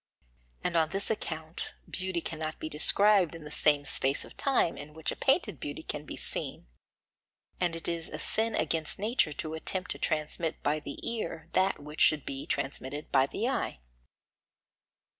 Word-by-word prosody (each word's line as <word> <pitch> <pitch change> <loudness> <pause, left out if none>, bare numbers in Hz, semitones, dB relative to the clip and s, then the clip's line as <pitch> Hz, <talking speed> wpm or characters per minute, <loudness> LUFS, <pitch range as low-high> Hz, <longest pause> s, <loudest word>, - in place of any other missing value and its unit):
And 180 - -1
on 160 -2 +3
this 195 +4 -1
account 160 -6 -1
beauty 185 -2 -1
cannot 155 -1 -4
be 155 - -5
described 190 +3 +5
in 165 - -9
the 150 - -9
same 145 -1 +3
space 135 0 +4
of - - -14
time 265 -11 +1
in 150 +1 -9
which 160 - -2
a - - -5
painted - - +2
beauty - - -6
can - - -2
be - - -7
seen, - - -3 0.9
and 175 -2 0
it 165 - -4
is 165 -1 -2
a 155 - -5
sin 220 +8 +2
against 160 -2 +1
nature 210 - +1
to 155 +2 -4
attempt 180 +3 -1
to - - -4
transmit 155 +1 -2
by 150 +1 +1
the 145 -1 -7
ear 170 -8 -3
that 190 +1 +2
which 150 +1 -5
should 150 -3 +5
be 135 0 -5
transmitted 140 +2 -3
by 135 -1 +4
the - - -2
eye. - - -2
160 Hz, 175 wpm, -30 LUFS, 150-180 Hz, 0.9 s, described